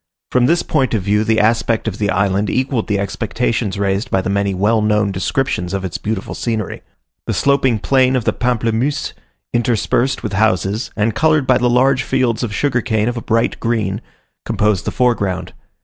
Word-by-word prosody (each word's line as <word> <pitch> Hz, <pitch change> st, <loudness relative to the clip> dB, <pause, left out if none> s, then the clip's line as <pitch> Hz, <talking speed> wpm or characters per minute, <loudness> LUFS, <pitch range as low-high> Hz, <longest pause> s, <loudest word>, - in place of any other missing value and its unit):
From 125 Hz, -1 st, +3 dB
this 170 Hz, +2 st, +2 dB
point 130 Hz, -6 st, 0 dB
of 100 Hz, -, -1 dB
view 105 Hz, +2 st, +2 dB
the 110 Hz, 0 st, +2 dB
aspect 115 Hz, +1 st, +1 dB
of 100 Hz, -3 st, -3 dB
the 105 Hz, -1 st, 0 dB
island 100 Hz, +1 st, +1 dB
equalled 130 Hz, -3 st, -1 dB
the 105 Hz, -, 0 dB
expectations 105 Hz, +1 st, -2 dB
raised 100 Hz, +1 st, -1 dB
by 95 Hz, -, +1 dB
the 95 Hz, -, -2 dB
many 100 Hz, 0 st, +1 dB
well 105 Hz, +4 st, +2 dB
known 105 Hz, -1 st, +1 dB
descriptions 95 Hz, -1 st, -1 dB
of 95 Hz, -1 st, -3 dB
its 90 Hz, -, -4 dB
beautiful 105 Hz, -2 st, -3 dB
scenery. 110 Hz, -4 st, -3 dB, 0.5 s
The -, -, -1 dB
sloping 135 Hz, -4 st, +2 dB
plain 130 Hz, +5 st, +2 dB
of 125 Hz, -, 0 dB
the -, -, +2 dB
Pamplemousses, 120 Hz, +3 st, -1 dB, 0.4 s
interspersed 120 Hz, +2 st, 0 dB
with 105 Hz, -4 st, -3 dB
houses, 105 Hz, +1 st, +1 dB
and 110 Hz, +1 st, +1 dB
coloured 155 Hz, -3 st, +2 dB
by 130 Hz, -1 st, +3 dB
the 125 Hz, -, +2 dB
large 130 Hz, +2 st, +3 dB
fields 130 Hz, -4 st, 0 dB
of 120 Hz, -4 st, -2 dB
sugar 125 Hz, +3 st, 0 dB
cane 110 Hz, -2 st, 0 dB
of 120 Hz, -, -3 dB
a -, -, -3 dB
bright 115 Hz, +1 st, 0 dB
green, 110 Hz, -3 st, -1 dB, 0.4 s
composed 105 Hz, -3 st, 0 dB
the -, -, -1 dB
foreground. 100 Hz, -7 st, 0 dB
110 Hz, 185 wpm, -18 LUFS, 100-125 Hz, 0.5 s, From